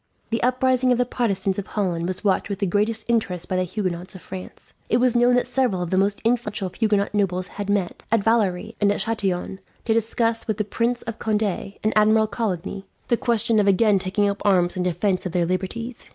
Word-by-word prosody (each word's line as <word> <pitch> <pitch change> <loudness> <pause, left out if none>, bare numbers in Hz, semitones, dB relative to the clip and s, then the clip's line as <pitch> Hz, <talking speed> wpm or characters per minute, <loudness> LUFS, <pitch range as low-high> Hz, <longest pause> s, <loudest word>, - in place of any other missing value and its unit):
The 230 - 0
uprising 255 +1 +2
of 245 - +3
the 250 - +2
Protestants 200 -6 -1
of 200 - -6
Holland 175 -5 -1
was 185 +2 -4
watched 200 0 +1
with 200 - -2
the 200 - 0
greatest 210 +4 0
interest 195 -7 0
by 185 - -2
the 185 0 +1
Huguenots 185 -1 -4
of 185 - -11
France. 185 -1 -10 0.2
It 235 - +3
was 250 -1 +3
known 245 +1 +4
that 250 - +2
several 245 -6 0
of 175 - -5
the 185 - +2
most 200 +1 +1
influential 215 -4 0
Huguenot 210 -3 +1
nobles 185 -3 0
had 205 -1 -6
met, 200 -3 -1
at 225 -3 +3
Valery 220 -2 +1
and 200 0 +4
at 205 - -2
Chatillon, 195 -4 -2 0.3
to 225 - +2
discuss 230 0 0
with 215 -2 -1
the 215 - 0
Prince 235 +4 -1
of 230 -1 -6
Conde 215 -1 0
and 205 +2 -2
Admiral 215 +1 +5
Coligny 195 -2 -3 0.2
the 235 - +4
question 230 -2 +2
of 205 - +2
again 200 +1 +4
taking 200 +2 0
up 200 0 -2
arms 180 -3 +3
in 185 - -2
defence 185 +2 0
of 175 - -8
their 175 -2 +2
liberties. 195 +7 -3
205 Hz, 215 wpm, -23 LUFS, 185-230 Hz, 0.3 s, Admiral